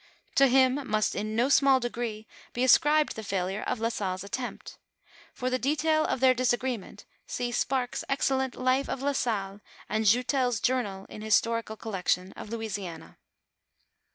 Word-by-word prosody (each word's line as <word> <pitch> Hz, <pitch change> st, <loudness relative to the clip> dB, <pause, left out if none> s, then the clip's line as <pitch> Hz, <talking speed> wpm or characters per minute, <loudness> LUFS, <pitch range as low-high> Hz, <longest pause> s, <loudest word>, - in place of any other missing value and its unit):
To 275 Hz, -, +5 dB
him 260 Hz, +1 st, +4 dB
m\i8t 215 Hz, -6 st, 0 dB
in 215 Hz, +2 st, -3 dB
no 235 Hz, +2 st, +3 dB
snicl! 275 Hz, -1 st, +5 dB
degree 235 Hz, -3 st, -4 dB, 0.3 s
be 245 Hz, -, -1 dB
ascribed 295 Hz, +4 st, +4 dB
the 220 Hz, -, -5 dB
failure 195 Hz, -1 st, -2 dB
of 250 Hz, -, -2 dB
La 230 Hz, +1 st, 0 dB
Salle's 190 Hz, -4 st, -3 dB
attempt 245 Hz, +5 st, -6 dB, 0.5 s
For 255 Hz, +1 st, -3 dB
the 255 Hz, -, 0 dB
detail 310 Hz, +3 st, +1 dB
of 255 Hz, -, -2 dB
their 260 Hz, -1 st, +6 dB
disagreement 240 Hz, -4 st, -2 dB, 0.2 s
see 245 Hz, -1 st, -3 dB
Sparks's 250 Hz, 0 st, -1 dB
excellent 265 Hz, -2 st, 0 dB
life 255 Hz, +2 st, +1 dB
of 270 Hz, -, -3 dB
La 285 Hz, -, +2 dB
Salle, 205 Hz, -7 st, -2 dB, 0.3 s
and 220 Hz, +1 st, -1 dB
Joutel's 250 Hz, +1 st, +2 dB
journal 210 Hz, -7 st, -1 dB
in 210 Hz, -, -10 dB
Historical 220 Hz, +1 st, +1 dB
Colleclion 185 Hz, -3 st, -2 dB
of -, -, -9 dB
Louisiana. 205 Hz, -7 st, -6 dB
240 Hz, 155 wpm, -28 LUFS, 215-260 Hz, 0.5 s, their